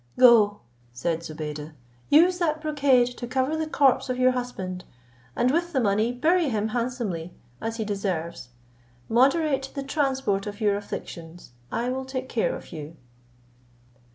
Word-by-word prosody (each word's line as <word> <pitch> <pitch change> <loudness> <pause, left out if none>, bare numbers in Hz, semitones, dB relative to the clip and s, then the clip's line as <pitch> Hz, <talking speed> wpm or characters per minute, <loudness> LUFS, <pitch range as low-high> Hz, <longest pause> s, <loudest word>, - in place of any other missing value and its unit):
"Go," 225 -5 +6 0.3
said 160 +7 -2
Zobeide, 155 -1 -6 0.4
"use 350 +5 +5
that 310 -3 +1
brocade 285 -5 +3
to 240 - -5
cover 260 +4 0
the 315 0 -2
corpse 265 -3 +3
of 250 - -1
your 255 0 +4
husband, 195 -8 -4 0.5
and 250 +1 +2
with 345 +3 0
the 265 - +2
money 215 +1 +2
bury 320 +6 +2
him 220 -2 -1
handsomely, 230 -8 -3 0.3
as 225 0 -3
he 220 - -2
deserves. 185 - -3 0.6
Moderate 270 +3 +2
the 275 - -3
transport 265 -8 0
of 205 0 -6
your 205 -2 +2
afflictions: 170 -6 -8 0.2
I 235 +2 -1
will 260 +1 -3
take 260 -1 -5
care - - 0
of - - -11
you." 155 -1 -8
245 Hz, 150 wpm, -25 LUFS, 195-275 Hz, 0.6 s, Go